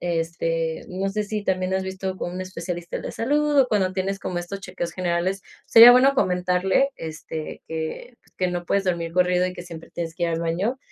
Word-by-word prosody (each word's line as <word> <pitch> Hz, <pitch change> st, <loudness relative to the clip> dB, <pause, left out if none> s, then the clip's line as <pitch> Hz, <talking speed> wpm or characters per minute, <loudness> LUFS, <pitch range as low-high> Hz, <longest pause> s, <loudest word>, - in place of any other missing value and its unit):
este, 165 Hz, -1 st, -2 dB
no 190 Hz, +2 st, -2 dB
sé 210 Hz, +2 st, -2 dB
si, 210 Hz, 0 st, -3 dB
también 185 Hz, -1 st, 0 dB
has 190 Hz, -, 0 dB
visto 190 Hz, 0 st, -4 dB
con 175 Hz, -, -4 dB
un 180 Hz, -, -5 dB
especialista 175 Hz, -1 st, -5 dB
de -, -, -8 dB
la -, -, -5 dB
salud 295 Hz, +4 st, +1 dB
o 265 Hz, -, +6 dB
cuando 195 Hz, -4 st, +1 dB
tienes 195 Hz, +1 st, -2 dB
como 180 Hz, -, -3 dB
estos 175 Hz, +3 st, -6 dB
chequeos 180 Hz, -3 st, -5 dB
generales, 185 Hz, +1 st, -1 dB, 0.2 s
sería 230 Hz, +1 st, +10 dB
bueno 260 Hz, +3 st, +6 dB
comentarle, 185 Hz, +4 st, +2 dB
este, 155 Hz, 0 st, -7 dB
que 160 Hz, -, -5 dB
pues, -, -, -29 dB
que 185 Hz, -, +1 dB
no 175 Hz, 0 st, -3 dB
puedes 195 Hz, +3 st, +1 dB
dormir 170 Hz, -2 st, -1 dB
corrido 180 Hz, 0 st, +3 dB
y 185 Hz, -, -2 dB
que 175 Hz, -, -7 dB
siempre 165 Hz, -2 st, -10 dB
tienes 165 Hz, -1 st, -5 dB
que 175 Hz, -, -6 dB
ir 170 Hz, -, +2 dB
al 165 Hz, -1 st, -1 dB
baño, 180 Hz, +10 st, -1 dB
185 Hz, 215 wpm, -24 LUFS, 170-195 Hz, 0.2 s, sería